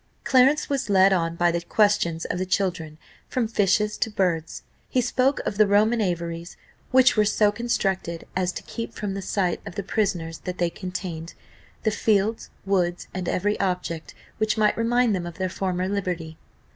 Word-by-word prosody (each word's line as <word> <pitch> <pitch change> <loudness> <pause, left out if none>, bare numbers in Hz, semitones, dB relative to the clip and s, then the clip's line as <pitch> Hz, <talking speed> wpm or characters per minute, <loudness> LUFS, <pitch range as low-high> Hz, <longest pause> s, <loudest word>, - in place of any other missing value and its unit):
Clarence 270 +3 +4
was 275 -6 -2
led 195 0 +5
on 165 -2 0
by 175 0 +3
the 170 0 -1
questions 170 -3 +1
of 180 - -3
the 185 - -1
children 180 -5 -1 0.3
from 245 -3 -1
fishes 210 0 +1
to - - +1
birds; 175 -6 -1 0.3
he 255 - +1
spoke 255 +3 +1
of 205 - -3
the 215 - +6
Roman 215 +3 +3
aviaries, 170 -2 -3 0.3
which 260 0 +5
were 215 - +4
so 210 0 +3
constructed 195 -7 -2
as 185 -1 +1
to - - -7
keep 230 -1 -6
from 205 -2 -3
the 195 - -4
sight 185 -2 -1
of - - -9
the 200 - -3
prisoners 180 -6 -1
that 180 0 -6
they 175 -1 0
contained, 180 -3 -6 0.5
"the 215 - +2
fields, 210 +1 +1 0.2
woods, 180 -3 0
and 185 -2 -3
every 205 +3 0
object 180 -4 -2 0.2
which 215 +1 +1
might 215 -1 +3
remind 235 0 +2
them 175 -2 -3
of 170 - -9
their 185 -1 -1
former 185 -1 -2
liberty." 180 -5 -3
195 Hz, 180 wpm, -24 LUFS, 175-215 Hz, 0.5 s, the